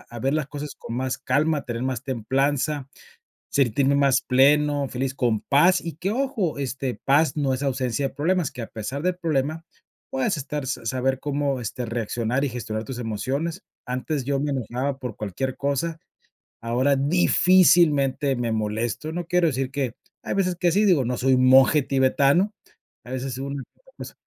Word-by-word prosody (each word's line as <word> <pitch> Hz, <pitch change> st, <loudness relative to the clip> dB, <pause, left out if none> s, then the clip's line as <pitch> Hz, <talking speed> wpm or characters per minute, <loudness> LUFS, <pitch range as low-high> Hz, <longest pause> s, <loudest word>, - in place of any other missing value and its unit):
a 120 Hz, -, -7 dB
ver 135 Hz, +3 st, 0 dB
las 150 Hz, -3 st, -1 dB
cosas 145 Hz, 0 st, -6 dB
con 115 Hz, -, -7 dB
más 130 Hz, 0 st, -1 dB
calma, 150 Hz, +3 st, 0 dB
tener 120 Hz, -1 st, -4 dB
más 130 Hz, -2 st, -2 dB
templanza, 135 Hz, +3 st, -1 dB, 0.6 s
sentirme 140 Hz, +1 st, +2 dB
más 140 Hz, -2 st, +3 dB
pleno, 145 Hz, +2 st, +3 dB
feliz, 130 Hz, +1 st, -3 dB
con 120 Hz, -6 st, 0 dB
paz, 175 Hz, +6 st, +4 dB
y 165 Hz, -3 st, -6 dB
que, 185 Hz, +4 st, -2 dB
ojo, 245 Hz, -, -1 dB
este, 135 Hz, -1 st, -3 dB
paz 150 Hz, +4 st, +3 dB
no 140 Hz, -3 st, +1 dB
es 135 Hz, -, -5 dB
ausencia 135 Hz, 0 st, -1 dB
de -, -, -16 dB
problemas, 170 Hz, +1 st, 0 dB
que, 125 Hz, -2 st, -7 dB
a -, -, -5 dB
pesar 130 Hz, +7 st, -5 dB
del 180 Hz, 0 st, 0 dB
problema, 155 Hz, -1 st, -1 dB, 0.5 s
puedes 250 Hz, -, 0 dB
estar 145 Hz, 0 st, -4 dB
sa 115 Hz, -3 st, -4 dB
saber 130 Hz, +2 st, 0 dB
cómo, 140 Hz, -2 st, -1 dB
este, 120 Hz, +2 st, -4 dB
reaccionar 115 Hz, +3 st, -2 dB
y -, -, 0 dB
gestionar 110 Hz, -2 st, -4 dB
tus 125 Hz, +2 st, -6 dB
emociones. 135 Hz, -, -3 dB, 0.2 s
Antes, 130 Hz, +2 st, -3 dB
yo 140 Hz, 0 st, 0 dB
me 145 Hz, -1 st, -1 dB
enojaba 130 Hz, +2 st, -2 dB
por 125 Hz, -5 st, -6 dB
cualquier 110 Hz, +6 st, -4 dB
cosa, 140 Hz, +4 st, -2 dB, 0.6 s
ahora, 125 Hz, +5 st, +1 dB
difícilmente 155 Hz, -3 st, +4 dB
me 120 Hz, -1 st, -2 dB
molesto, 110 Hz, +7 st, -2 dB
no 175 Hz, 0 st, -4 dB
quiero 180 Hz, -1 st, +3 dB
decir 135 Hz, -2 st, -1 dB
que 135 Hz, -5 st, -2 dB, 0.3 s
hay -, -, -3 dB
veces 185 Hz, -3 st, 0 dB
que 175 Hz, -2 st, +2 dB
sí, 205 Hz, +2 st, +3 dB
digo, 170 Hz, -, +3 dB
no 125 Hz, +1 st, -1 dB
soy 130 Hz, +1 st, +2 dB
un 130 Hz, 0 st, +3 dB
monje 135 Hz, +2 st, +6 dB
tibetano, 140 Hz, +8 st, +2 dB, 0.5 s
a 125 Hz, -, -9 dB
veces 130 Hz, -1 st, -4 dB
una 140 Hz, 0 st, -4 dB
que -, -, -27 dB
otra -, -, -23 dB
cosa. -, -, -8 dB
135 Hz, 180 wpm, -24 LUFS, 125-155 Hz, 0.6 s, monje